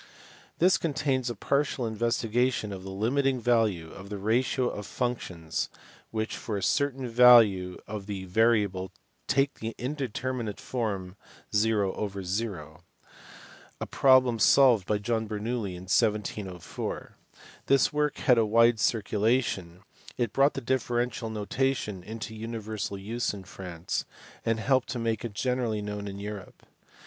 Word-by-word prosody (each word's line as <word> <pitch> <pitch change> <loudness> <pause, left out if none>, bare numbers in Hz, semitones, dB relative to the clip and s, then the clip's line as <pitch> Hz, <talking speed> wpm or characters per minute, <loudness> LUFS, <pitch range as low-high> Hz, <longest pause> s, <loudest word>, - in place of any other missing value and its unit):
This 185 +3 +4
contains 140 -5 0
a 120 - -4
partial 140 +2 0
investigation 115 0 0
of 95 - -7
the 95 - -8
limiting 130 +7 +1
value 110 -9 +1
of 100 +1 -10
the 105 - -4
ratio 120 +5 +1
of 105 -4 -5
functions 90 -11 -3 0.4
which 110 0 -3
for 105 -3 -4
a 95 - -4
certain 135 0 0
value 115 -7 +6
of 105 -2 -6
the 95 -2 -4
variable 100 -2 +2 0.4
take 135 0 +1
the 115 +1 -4
indeterminate 130 -4 -3
form: 100 -6 -3 0.4
0, 105 -2 +2 1.9
a - - -3
problem 130 -3 +4
solved 120 -6 +5
by 105 - +2
John 110 +1 -1
Bernoulli 105 -2 -3
in 90 - -9
1704. 105 -3 -2 0.5
This 135 +1 +4
work 150 -1 0
had 125 -2 +4
a - - +4
wide 115 +1 +4
circulation, 105 -4 0 0.4
it 120 -4 -1
brought 140 +2 +3
the 135 - -3
differential 120 -2 -1
notation 110 -1 -1
into 110 +3 -7
universal 110 -2 -4
use 110 +3 -2
in 95 - -9
France, 90 -3 -5 0.4
and 115 -1 0
helped 130 +3 +2
to 125 - -3
make 115 -2 -1
it 115 -3 -5
generally 120 -2 -1
known 105 0 -5
in 100 0 -6
Europe. 100 -1 -8
110 Hz, 135 wpm, -28 LUFS, 100-125 Hz, 1.9 s, value